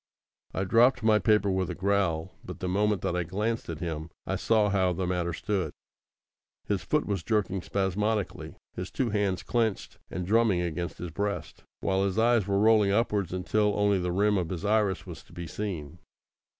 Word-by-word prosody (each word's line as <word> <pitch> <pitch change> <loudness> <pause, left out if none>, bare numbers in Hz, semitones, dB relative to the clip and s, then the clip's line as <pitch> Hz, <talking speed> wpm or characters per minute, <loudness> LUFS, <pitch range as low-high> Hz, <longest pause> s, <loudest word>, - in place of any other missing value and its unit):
I 95 - 0
dropped 120 +5 +4
my 110 -1 +5
paper 105 0 +3
with 95 -1 0
a - - -4
growl, 95 -3 0
but - - -8
the 90 - -3
moment 105 +1 +1
that 90 - 0
I 90 - +1
glanced 105 +7 -2
at 80 -2 -5
him 80 -2 -4 0.2
I - - -1
saw 110 -2 +2
how 95 -2 +2
the 90 +2 -2
matter 90 -1 -1
stood. 90 -3 -2 0.9
His 100 -3 -1
foot 150 - 0
was 100 -4 -1
jerking 100 -2 0
spasmodically, 100 +3 -1 0.2
his 90 +1 -5
two 125 -4 -1
hands 100 -3 0
clenched, 115 -4 -1
and 90 -1 -4
drumming 105 -2 +3
against 85 0 -3
his 90 -2 -6
breast, 100 +4 -3 0.2
while 95 0 +1
his 100 0 -1
eyes 115 -3 +3
were 100 -1 +1
rolling 105 -1 +5
upwards 105 -3 +1
until 105 +3 +1
only 100 -1 +3
the 90 0 -1
rim 100 +2 +2
of 85 -2 -3
his 90 +1 -4
iris 105 -2 +1
was - - -8
to - - -20
be 85 - -6
seen. 85 -5 -5
100 Hz, 190 wpm, -28 LUFS, 90-105 Hz, 0.9 s, my